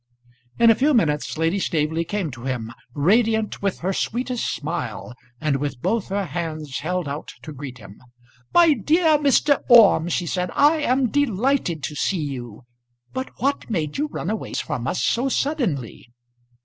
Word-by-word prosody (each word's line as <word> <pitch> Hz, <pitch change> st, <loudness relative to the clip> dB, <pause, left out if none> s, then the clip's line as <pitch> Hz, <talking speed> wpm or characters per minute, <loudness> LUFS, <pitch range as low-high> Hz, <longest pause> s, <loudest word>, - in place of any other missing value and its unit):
In 230 Hz, -1 st, +6 dB
a -, -, +7 dB
few 280 Hz, +6 st, +2 dB
minutes 150 Hz, -9 st, +1 dB
Lady 165 Hz, +5 st, +1 dB
Staveley 160 Hz, -1 st, 0 dB
came 180 Hz, -2 st, -3 dB
to 125 Hz, 0 st, -10 dB
him, 120 Hz, -3 st, -3 dB, 0.2 s
radiant 220 Hz, +7 st, +2 dB
with 200 Hz, -2 st, -2 dB
her 190 Hz, +3 st, -1 dB
sweetest 245 Hz, +4 st, -2 dB
smile, 140 Hz, -7 st, -4 dB, 0.3 s
and 150 Hz, -3 st, 0 dB
with 140 Hz, -2 st, -4 dB
both 225 Hz, -, -1 dB
her 195 Hz, 0 st, -2 dB
hands 155 Hz, -5 st, -4 dB
held 180 Hz, +2 st, -2 dB
out 145 Hz, +2 st, -6 dB
to 155 Hz, -, -8 dB
greet 135 Hz, -2 st, -8 dB
him. 100 Hz, -2 st, -14 dB, 0.5 s
"My 335 Hz, -3 st, +6 dB
dear 315 Hz, +1 st, +3 dB
Mr. 285 Hz, 0 st, +3 dB
Orme," 205 Hz, -8 st, +7 dB
she 175 Hz, +1 st, -1 dB
said, 180 Hz, +1 st, -2 dB
"I 295 Hz, +3 st, +5 dB
am 260 Hz, -4 st, +1 dB
delighted 250 Hz, -, 0 dB
to 150 Hz, +4 st, -4 dB
see 165 Hz, +2 st, -1 dB
you; 125 Hz, -5 st, -6 dB, 0.5 s
but 260 Hz, 0 st, -4 dB
what 280 Hz, 0 st, -1 dB
made 160 Hz, -, -2 dB
you 300 Hz, -, 0 dB
run 205 Hz, -, -4 dB
away 220 Hz, -, -5 dB
from 125 Hz, +1 st, -3 dB
us 180 Hz, -, -1 dB
so 255 Hz, +3 st, +1 dB
suddenly?" 215 Hz, -, -2 dB
180 Hz, 165 wpm, -22 LUFS, 150-245 Hz, 0.5 s, a